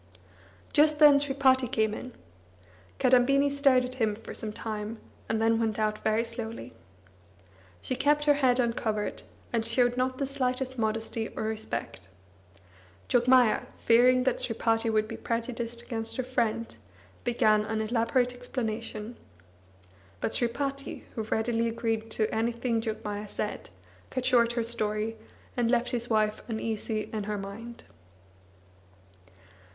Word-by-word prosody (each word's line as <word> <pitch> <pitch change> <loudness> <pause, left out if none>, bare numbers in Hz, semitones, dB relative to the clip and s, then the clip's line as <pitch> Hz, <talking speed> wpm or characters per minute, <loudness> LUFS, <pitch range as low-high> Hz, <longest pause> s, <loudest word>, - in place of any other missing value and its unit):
Just 300 0 +5
then 295 -2 +8
Sripati 270 -2 +3
came 220 -1 +1
in. 250 +2 -7 0.8
Kadambini 275 +3 +4
stared 275 -3 +4
at 250 - -6
him 215 -2 +2
for 225 - -9
some 215 - -4
time, 215 +1 -5 0.3
and 220 - +1
then 225 0 +3
went 220 -2 0
out 215 -1 0
very 220 +1 +2
slowly. 230 - -6 1.1
She 255 - -1
kept 295 +3 +2
her 295 - +6
head 260 -3 +2
uncovered, 225 -3 -1 0.3
and 230 -1 +1
showed 245 +2 +2
not 255 0 0
the 275 - -1
slightest 260 -1 -2
modesty 220 0 -1
or - - -2
respect. 220 - -4 1.0
Jogmaya, 245 -1 +4
fearing 250 +2 +5
that 260 -1 0
Sripati 225 0 +1
would 215 -1 +1
be - - -6
prejudiced 235 0 -3
against 225 0 -3
her 255 - 0
friend, 230 -3 -1 0.5
began 215 -3 +3
an 220 0 -2
elaborate 235 +3 +1
explanation. 230 -2 -5 1.0
But - - -2
Sripati, 275 +3 -2
who 225 - -3
readily 225 +2 0
agreed 225 -1 -2
to 220 0 0
anything 230 +1 0
Jogmaya 210 -2 -4
said, 210 - -4 0.4
cut 255 -1 -3
short 240 -2 +4
her 235 -1 0
story, 220 -1 -1 0.4
and 240 -2 +1
left 240 0 +2
his 240 -1 -1
wife 215 -1 +1
uneasy 220 -1 -2
in 215 -2 -2
her 210 0 -2
mind. 215 +4 -8
230 Hz, 135 wpm, -28 LUFS, 220-250 Hz, 1.1 s, then